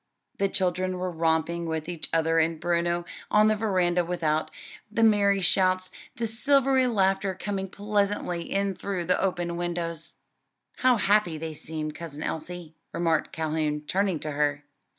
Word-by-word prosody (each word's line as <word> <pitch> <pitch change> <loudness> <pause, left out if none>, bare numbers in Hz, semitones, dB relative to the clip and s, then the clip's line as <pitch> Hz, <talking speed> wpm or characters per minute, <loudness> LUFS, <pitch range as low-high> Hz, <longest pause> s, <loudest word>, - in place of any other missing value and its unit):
The 195 0 +2
children 185 0 0
were 180 0 -2
romping 165 +1 0
with 160 -1 -3
each 175 -3 -4
other 165 0 +2
and 160 0 +1
Bruno 175 0 0 0.2
on 215 +1 +5
the 215 - +3
veranda 185 -5 +1
without; 160 -3 -1 0.4
the 230 +1 +1
merry 200 -2 +4
shouts, 185 0 +2 0.2
the 235 - -2
silvery 265 +3 +3
laughter 195 -3 +1
coming 195 0 -3
pleasantly 200 -4 -1
in 195 0 +1
through 185 -2 -3
the 180 - +2
open 175 -2 -1
windows. 170 -2 -4 0.6
"How 255 -1 +4
happy 205 -5 +2
they 160 0 -5
seem, 155 0 -5
Cousin 155 -1 -7
Elsie," 170 0 -5 0.2
remarked 165 -2 0
Calhoun, 155 -2 -1
turning 185 +2 0
to 155 - -3
her. 145 0 0
175 Hz, 150 wpm, -27 LUFS, 165-200 Hz, 0.6 s, on